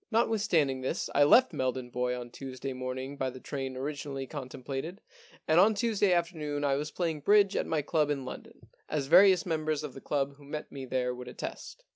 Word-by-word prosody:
Notwithstanding 205 - +2
this, 130 - -2
I 145 - +5
left 255 - +6
Meldon 130 -1 -2
Bois 125 0 -1
on 120 -1 -8
Tuesday 135 0 -6
morning 130 +2 -5
by 130 -1 -1
the 130 0 -9
train 135 -1 -5
origin 145 +1 -4
ally 135 -1 -4
contemplated, 135 +5 -6 0.5
and 160 +2 +5
on 215 +3 +5
Tuesday 210 -3 +2
afternoon 160 -4 -1
I 140 -1 +2
was 145 +2 -1
playing 165 -2 -2
bridge 200 +5 +4
at - - 0
my 155 -2 0
club 150 0 +1
in 140 -3 -2
London, 130 - -10 0.2
as 150 -3 -1
various 185 +4 +6
members 155 -3 -1
of 145 -4 -6
the 135 - -10
club 140 -1 -1
who 145 - -16
met 150 +2 -6
me 135 -2 -6
there 125 -1 -1
would 125 0 -9
attest.' 125 - -7
145 Hz, 200 wpm, -30 LUFS, 130-165 Hz, 0.5 s, left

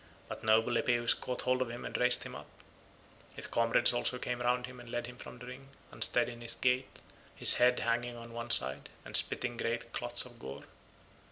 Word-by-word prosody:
But - - -8
noble 115 +2 +3
Epeus 120 -1 +2
caught 125 -1 -5
hold 130 0 +1
of 125 - -1
him 120 +1 -7
and - - -7
raised 125 0 +4
him - - -8
up; - - -10 0.9
his - - -3
comrades 115 +1 +2
also 120 +1 -1
came 125 0 -4
round 125 0 0
him 130 0 -12
and 120 -1 -12
led 120 0 -3
him 125 0 -10
from 125 - -11
the 125 - -11
ring, 130 +2 -10 0.2
unsteady - - 0
in 120 0 -12
his 115 0 -2
gait, 125 +1 +1 0.5
his - - +7
head 125 0 +4
hanging 120 +1 -1
on 115 0 -11
one 120 0 -6
side, 65 - +5 0.2
and - - -6
spitting 120 -1 +2
great 115 0 -3
clots 120 0 -1
of 120 -2 -14
gore. 70 +2 -8
120 Hz, 205 wpm, -32 LUFS, 115-125 Hz, 0.9 s, his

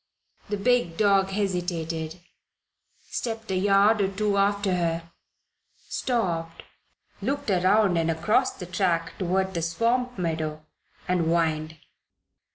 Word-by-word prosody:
The 205 - -1
big 215 -6 +1
dog 195 -2 +3
hesitated, 175 -4 -2 0.9
stepped 225 -3 -4
a - - 0
yard 200 +3 +4
or 195 - +3
two 200 +1 -1
after 200 -1 +2
her, 170 -1 -1 0.8
stopped, 170 -9 -2 0.6
looked 285 -5 -1
around 190 0 +3
and 165 0 +1
across 210 +11 +2
the 180 - -8
track 175 -2 0
toward 190 +1 0
the 170 - -2
swamp 235 +9 0
meadow, 160 -3 -3 0.4
and 180 -2 +1
whined. 160 -1 0
185 Hz, 115 wpm, -26 LUFS, 165-205 Hz, 0.9 s, yard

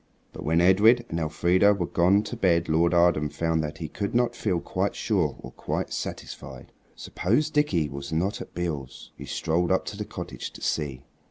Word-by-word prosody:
But - - -8
when 80 +3 +2
Edred 110 +7 +5
and 85 - -2
Elfrida 90 +6 +3
were 90 -3 -1
gone 90 +5 +3
to 105 - -6
bed 85 -2 +2
Lord 80 +2 +3
Arden 85 -4 +3
found 80 +1 0
that 75 +1 -5
he 80 - -5
could 100 +7 -4
not 120 0 +2
feel 95 -5 0
quite - - -2
sure - - 0
or - - -10
quite - - -4
satisfied. 65 -2 -7 0.2
Suppose 145 +12 0
Dickie 105 - +1
was 70 0 -7
not 90 +6 -1
at - - -10
Beale's? 75 -7 -5
He - - -9
strolled 85 +2 0
up 95 - +2
to 100 - -6
the 105 - -3
cottage - - -7
to - - -12
see. 70 -4 -2
85 Hz, 190 wpm, -26 LUFS, 80-100 Hz, 0.2 s, Edred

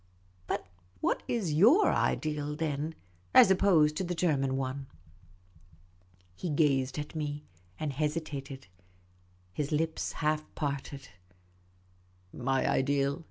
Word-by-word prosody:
But - - -2 0.3
what - - 0
iajotir 225 - +4
ideal, 150 -1 -1
then, 155 0 -2 0.4
as 190 - +9
opposed 170 -6 +4
to - - -1
the 175 0 -3
German 135 -6 +1
one? 135 +1 -3 0.5
' 90 -1 -29
' 90 0 -33
He 175 - -4
gazed 140 -3 +1
at 150 0 -5
me 150 -2 -4 0.3
and 150 -2 -2
hesitated. 145 -2 -3 0.9
His 145 - -3
lips 160 +1 -1
half 155 0 0
parted. 140 -1 -4 0.7
" 90 0 -34
My 135 +1 0
ideal 140 +2 +1
145 Hz, 115 wpm, -30 LUFS, 130-155 Hz, 0.9 s, as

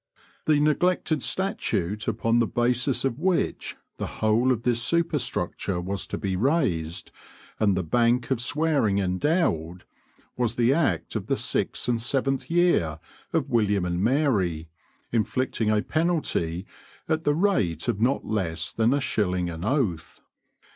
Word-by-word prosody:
The 150 -2 +4
neglected 155 0 +1
statute 125 - -1
upon 115 +1 +1
the 115 - +2
basis 125 +3 +1
of 130 0 -1
which 185 0 -1 0.2
the - - -3
whole 115 +4 +1
of 120 -2 -1
this 120 -2 +1
superstructure 125 - -1
was 95 +3 -3
to - - -4
be 95 -2 -2
raised 95 - 0 0.5
and 100 -3 +2
the 95 - 0
Bank 120 +7 +1
of 125 -3 +1
Swearing 145 -6 +1
endowed, 90 - 0 0.5
was 120 -2 0
the 120 +2 +3
act 140 - 0
of - - -3
the - - +1
sixth - - -1
and 120 -2 +1
seventh 135 +2 0
year 170 - +2 0.3
of - - -1
William 105 -5 +2
and 90 +1 -1
Mary, 105 - +1 0.4
inflicting 115 0 0
a 105 -1 +2
penalty 150 - 0 0.4
at 160 0 0
the 145 -2 +2
rate 125 - +1
of 100 - -1
not 130 +4 +1
less 85 -6 -2
than 115 +4 +2
a 145 - 0
shilling 90 -8 0
an 80 +1 -7
oath. 105 - -1
115 Hz, 145 wpm, -25 LUFS, 95-145 Hz, 0.5 s, The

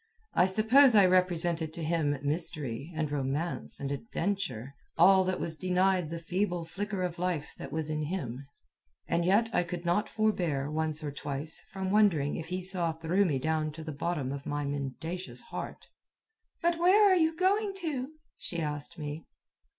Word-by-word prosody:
I 180 - +4
suppose 220 +6 +5
I 200 -2 +7
represented 175 -3 +1
to 170 - -5
him 155 -3 0
mystery, 145 -2 -1
and 155 -2 -1
romance, 145 +4 -2
and 140 0 -3
adventure 140 - -3 0.2
all 190 +3 +6
that 185 0 -1
was 160 - -2
denied 185 -1 +1
the 170 - -4
feeble 175 0 -2
flicker 195 +2 -4
of 175 -1 -3
life 175 -5 -2
that - - -7
was 155 0 -2
in 155 0 -1
him. 140 -7 -4 0.6
And 170 0 +1
yet 215 +5 +3
I - - +3
could 175 0 -5
not 175 +5 +1
forbear, 170 -10 0
once 155 0 -1
or 145 - -3
twice, 145 +2 0
from 190 -1 -3
wondering 185 -9 +3
if 160 - -5
he 180 +1 -3
saw 180 -3 +3
through 165 +5 +1
me 150 -7 +1
down 155 +2 -1
to 160 +1 -8
the 155 - -5
bottom 145 -2 -2
of 140 0 -6
my 145 0 -2
mendacious 145 +6 -4
heart. - - -7 0.8
"But 340 0 +2
where 390 +5 +6
are - - +6
you 320 -2 +2
going 395 +2 +1
to?" 280 -6 -3 0.3
she 175 - -3
asked 150 +1 -4
me. 150 0 -6
170 Hz, 175 wpm, -30 LUFS, 150-190 Hz, 0.8 s, I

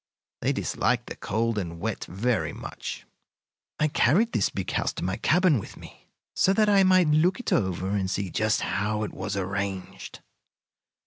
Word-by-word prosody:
They - - +1
dislike - - 0
the - - -7
cold 115 +1 -1
and 85 -3 -5
wet 110 +2 -3
very 110 +6 -1
much. - - -7 0.7
"I 150 - +3
carried 175 - +3
this 100 - +1
big 95 - -4
house - - 0
to - - -6
my 95 +2 -1
cabin 160 +2 +3
with - - -10
me, - - -14 0.3
so 190 - +3
that 215 +1 +3
I 200 -1 +5
might 185 -3 +5
look 165 +7 +3
it 245 - -1
over 95 - 0
and 100 -2 0
see 95 -1 -2
just 110 +3 +1
how 105 +1 -1
it 105 - -5
was 100 +1 -4
arranged. 95 0 -4
110 Hz, 175 wpm, -26 LUFS, 95-160 Hz, 0.7 s, I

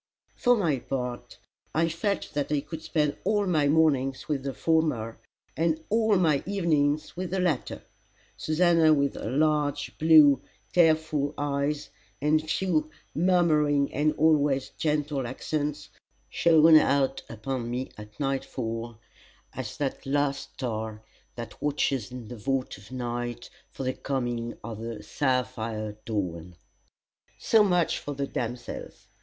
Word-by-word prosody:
For 245 0 +4
my 160 - +1
part, 125 -1 -5 0.4
I 165 +1 +3
felt 175 +4 -2
that 145 0 -2
I 145 -2 +1
could 155 +2 -8
spend 150 -2 0
all 205 +1 +1
my 155 -6 +2
mornings 140 -4 +2
with 145 -3 -1
the 135 0 -4
former, 135 -4 0 0.4
and 160 -1 +1
all 220 -1 +3
my 160 -7 +3
evenings 155 -7 +1
with 180 0 -4
the 190 - -1
latter. 170 -8 -1 0.5
Susannah 160 -1 +4
with 140 -1 +1
her - - -5
large, 145 +1 0
blue, 155 -3 +7 0.3
tearful 155 -4 +2
eyes, 145 +1 -1 0.3
and 150 +2 +2
few, 160 -4 0 0.2
murmuring 155 -5 +2
and 150 +2 +2
always 145 -3 +2
gentle 150 -4 -1
accents, 150 +3 -3 0.4
shone 160 -1 +6
out 135 -2 +2
upon 120 +1 -4
me 125 +2 -3
at 105 0 -12
nightfall 120 -4 -3 0.6
as 130 -4 -6
that 135 -2 -3
last 140 0 -1
star 110 -3 -4 0.3
that 115 -1 -8
watches 140 -4 0
in 125 -3 -8
the 120 - -8
vault 135 +4 -2
of 100 +5 -16
night 120 -1 -4 0.2
for - - -7
the 130 0 -1
coming 120 -4 -3
of 115 -2 -6
the 115 -1 -6
sapphire 115 -5 -2
dawn. 90 -5 -3 0.8
So 220 -2 +4
much 180 -4 +2
for 145 - -6
the 140 0 -1
damsels. 120 -2 -6
145 Hz, 135 wpm, -27 LUFS, 125-155 Hz, 0.8 s, blue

